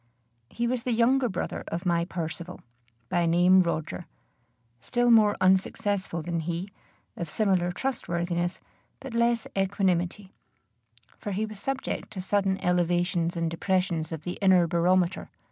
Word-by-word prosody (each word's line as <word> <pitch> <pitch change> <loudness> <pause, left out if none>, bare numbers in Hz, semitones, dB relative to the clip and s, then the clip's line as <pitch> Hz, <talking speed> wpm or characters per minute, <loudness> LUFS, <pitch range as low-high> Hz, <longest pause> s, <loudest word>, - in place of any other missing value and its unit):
He 235 - -2
was 245 0 0
the 245 0 -1
younger 245 +2 +3
brother 185 - -4
of 170 +3 -4
my 170 -1 +2
Percivale, 175 0 -5 0.5
by 175 -2 +1
name 180 +3 +5
Roger, 170 0 -3 0.7
still 240 - +1
more 215 -3 +5
unsuccessful 190 -1 +1
than 170 0 -2
he; 170 +4 -3 0.5
of 170 -3 -5
similar 185 -3 +1
trustworthiness, 175 -7 -2 0.4
but 270 -3 -8
less 235 0 +2
equanimity; 190 -1 0 0.9
for 205 - -4
he 210 +3 0
was 215 -2 -9
subject 270 +4 -3
to 195 - -6
sudden 195 0 +1
elevations 175 -1 +1
and 165 -1 -1
depressions 170 -2 -1
of 160 -2 -5
the 180 - -5
inner 185 -3 +5
barometer. 175 +2 +1
185 Hz, 135 wpm, -27 LUFS, 170-205 Hz, 0.9 s, name